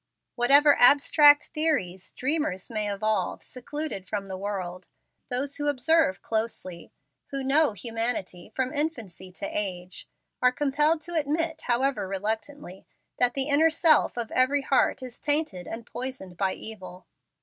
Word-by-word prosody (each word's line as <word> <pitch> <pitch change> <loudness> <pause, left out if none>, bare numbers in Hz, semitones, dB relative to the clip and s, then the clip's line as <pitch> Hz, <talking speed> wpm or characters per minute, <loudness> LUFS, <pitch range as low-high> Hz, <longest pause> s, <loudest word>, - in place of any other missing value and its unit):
Whatever 280 +4 +5
abstract 290 +3 +6
theories 285 - -1
dreamers 260 - -2
may 210 -2 -1
evolve 200 -2 -2
secluded 280 -6 -6
from 205 -2 -3
the 190 -1 -6
world, 185 -2 -5 0.4
those 270 +3 -2
who 290 - -3
observe 290 - +2
closely 220 -6 -3 0.4
who 275 -1 -4
KNOW 285 -1 +3
humanity 225 -4 -4
from 260 +2 -2
infancy 230 - -3
to 200 - -5
age 185 -3 -4 0.3
are 250 - +5
compelled 295 +4 +1
to 345 - -7
admit, 320 +1 -1
however 255 -2 0
reluctantly, 210 +2 -5 0.3
that 245 -1 +2
the 270 0 0
inner 300 +3 +4
self 315 -5 +3
of 235 -2 -4
every 275 +2 +2
heart 265 -1 +1
is 250 -2 -9
tainted 290 - -1
and 225 0 -7
poisoned 245 -8 -7
by 190 +1 -1
evil. 185 -4 -10
245 Hz, 140 wpm, -26 LUFS, 195-290 Hz, 0.4 s, abstract